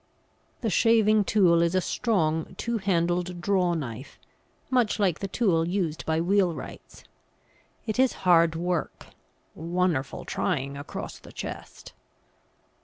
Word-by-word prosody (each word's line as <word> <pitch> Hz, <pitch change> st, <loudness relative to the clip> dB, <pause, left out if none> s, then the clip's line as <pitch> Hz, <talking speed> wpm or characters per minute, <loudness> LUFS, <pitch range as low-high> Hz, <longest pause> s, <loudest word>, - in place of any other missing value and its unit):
The 225 Hz, -4 st, -1 dB
shaving 215 Hz, 0 st, +4 dB
tool 180 Hz, -6 st, +4 dB
is 170 Hz, +2 st, +1 dB
a -, -, +4 dB
strong 165 Hz, -7 st, -1 dB
two 235 Hz, -1 st, -2 dB
handled 175 Hz, -2 st, 0 dB
draw 180 Hz, -1 st, +1 dB
knife, 130 Hz, -4 st, -6 dB, 0.5 s
much 245 Hz, -4 st, +2 dB
like 185 Hz, -6 st, +1 dB
the 195 Hz, -, -3 dB
tool 185 Hz, -5 st, +1 dB
used 175 Hz, -4 st, -2 dB
by 160 Hz, 0 st, +1 dB
wheelwrights. 180 Hz, 0 st, -1 dB, 0.8 s
It 220 Hz, +2 st, -3 dB
is 260 Hz, -1 st, +4 dB
hard 170 Hz, -2 st, +5 dB
work, 175 Hz, 0 st, -3 dB, 0.5 s
"wunnerful 165 Hz, -4 st, -1 dB
tryin' 140 Hz, 0 st, -2 dB
across 140 Hz, +1 st, -7 dB
the -, -, -14 dB
chest." -, -, -8 dB
175 Hz, 120 wpm, -26 LUFS, 165-205 Hz, 0.8 s, hard